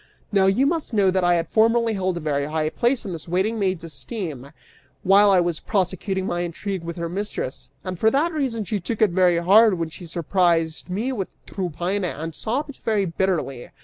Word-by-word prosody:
Now 195 -2 +4
you 200 +8 +3
must 310 -5 -1
know 195 -3 +4
that 185 0 +1
I 175 0 +4
had 170 -1 -1
formerly 230 +1 +3
held 185 -3 -1
a - - -4
very 145 -2 -1
high 155 0 -1
place 245 0 0
in 190 - -4
this 165 0 -8
waiting 190 +6 0
maid's 185 -4 -1
esteem, 150 - -5 0.5
while 200 +2 +6
I 190 -2 +5
was 175 -2 0
prosecuting 190 -1 -1
my 175 - -2
intrigue 175 +2 -4
with 170 0 -5
her 170 0 -2
mistress, 185 -7 -4
and 185 -2 -5
for 220 - +4
that 305 +8 +1
reason 255 -8 -1
she 210 +1 -2
took 205 +5 -4
it 210 - +3
very 180 -1 +3
hard 200 +5 +5
when 165 -2 -3
she 175 +2 -9
surprised 170 -1 0
me 215 +8 -1
with 200 -7 -3 0.2
Tryphaena, 180 +1 -2
and 160 +2 -5
sobbed 270 - -3
very 215 -3 +1
bitterly. 165 -8 -2
185 Hz, 200 wpm, -23 LUFS, 170-215 Hz, 0.5 s, while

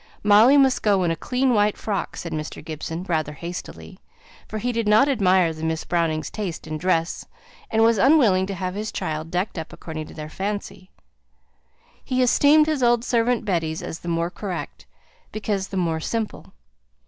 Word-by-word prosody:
"Molly 215 +7 +6
must 270 -2 +4
go 200 -3 +2
in 170 - +1
a - - 0
clean 255 +9 0
white 210 -1 +2
frock," 205 -3 -3
said 170 - -6
Mr. 155 -1 -5
Gibson, 160 +2 -5
rather 155 -5 -1
hastily; 170 +4 -8 0.5
for 220 - -5
he 245 +4 -1
did 230 -2 -1
not 215 +6 +5
admire 185 - +3
the 155 0 -9
Miss 160 0 -2
Brownings' 165 -3 -1
taste 195 -6 -5
in 155 -1 -5
dress, 170 -1 0 0.4
and 225 0 +2
was 225 -2 +4
unwilling 225 -9 +4
to 195 - -4
have 185 0 -3
his 210 +2 -4
child 155 +1 -4
decked 180 +1 -2
up 160 - -7
according 155 -2 -7
to - - -13
their 150 -1 -6
fancy; 195 +1 -5 1.1
he 255 -1 +1
esteemed 290 +5 +5
his 305 -3 -1
old 240 -1 +3
servant 235 -1 +1
Betty's 165 -5 -1
as 160 - -6
the - - -10
more 170 0 -1
correct, 180 - -6 0.4
because 205 -2 -2
the 195 - -5
more 165 -3 0
simple. 220 +6 -4
190 Hz, 180 wpm, -23 LUFS, 165-225 Hz, 1.1 s, Molly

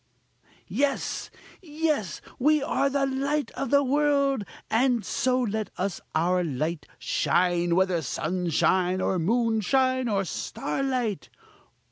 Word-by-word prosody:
Yes! 280 0 -1 0.3
yes! 300 - -2 0.2
we 300 +2 +3
are 280 -2 +1
the 275 0 +1
light 280 +2 -1
of 275 - -4
the 280 +1 +4
world, 280 -2 +2 0.2
and 240 0 +2
so 255 -1 +1
let 220 -2 -2
us 185 -2 -2 0.2
let - - +4
our 180 +2 +2
light 155 +2 -3
shine, 175 -1 +1
whether 185 -2 +2
sunshine, 180 +4 0
or 185 0 0
moonshine, 240 +5 +1
or 195 -2 0
starlight! 235 - -2
230 Hz, 115 wpm, -26 LUFS, 180-275 Hz, 0.3 s, the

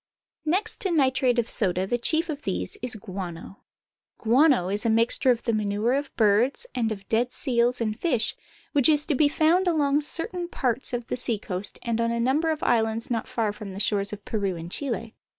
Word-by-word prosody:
Next 400 +10 0
to 390 - 0
nitrate 260 -5 +2
of 235 -1 +1
soda 185 -4 0
the 240 +5 -1
chief 320 +7 +2
of 300 -3 -5
these - - -3
is 245 -1 -1
guano. 190 -3 -7 0.6
Guano 250 - +3
is 205 +2 -1
a 230 - +1
mixture 230 +3 +2
of 240 -2 +2
the 230 - 0
manure 210 +2 0
of 280 0 -2
birds, 230 - +2
and 230 -3 0
of 195 -2 -7
dead 240 +3 +1
seals, 245 -1 +1
and 215 -1 -2
fish, 250 -10 +1 0.4
which 285 -1 +4
is 295 -1 +4 0.2
found 335 +5 +2
along 295 -3 +2
certain 345 +3 -2
parts 260 -6 -1
of 245 -1 -3
the - - -3
seacoast 205 -5 -2
and 230 -1 -1
on 230 - +1
a 235 0 -1
number 275 +7 +1
of 315 -1 -2
islands 225 0 +1
not 230 -2 -1
far 220 -3 -1
from 205 -2 -8
the 195 - -7
shores 200 -1 0
of 210 -1 -8
Peru 200 -4 -2
and 170 +1 -8
Chile. 230 -4 -4
235 Hz, 195 wpm, -25 LUFS, 215-285 Hz, 0.6 s, which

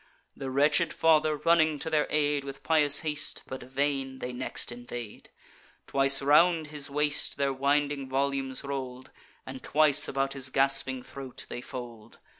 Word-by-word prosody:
The 135 - -6
wretched 150 +4 +2
father, 155 -1 +3
running 160 -1 +3
to 145 - -4
their 155 -2 +1
aid 145 -1 +1
With 135 0 -9
pious 150 -3 +2
haste, 150 -2 -2
but 130 0 -7
vain, 135 +1 -2
they 125 -1 -6
next 125 0 -3
invade; 120 -2 -8 0.6
Twice 135 0 +2
round 160 +3 +4
his 150 -2 -2
waist 150 +1 0
their 140 -1 0
winding 140 0 0
volumes 135 0 -1
roll'd; 130 -2 -6 0.3
And 130 0 -8
twice 150 -1 +4
about 135 0 -1
his 135 -2 -2
gasping 135 -1 +1
throat 135 -2 -8
they 120 - -6
fold. 120 -4 -9
140 Hz, 150 wpm, -28 LUFS, 130-150 Hz, 0.6 s, round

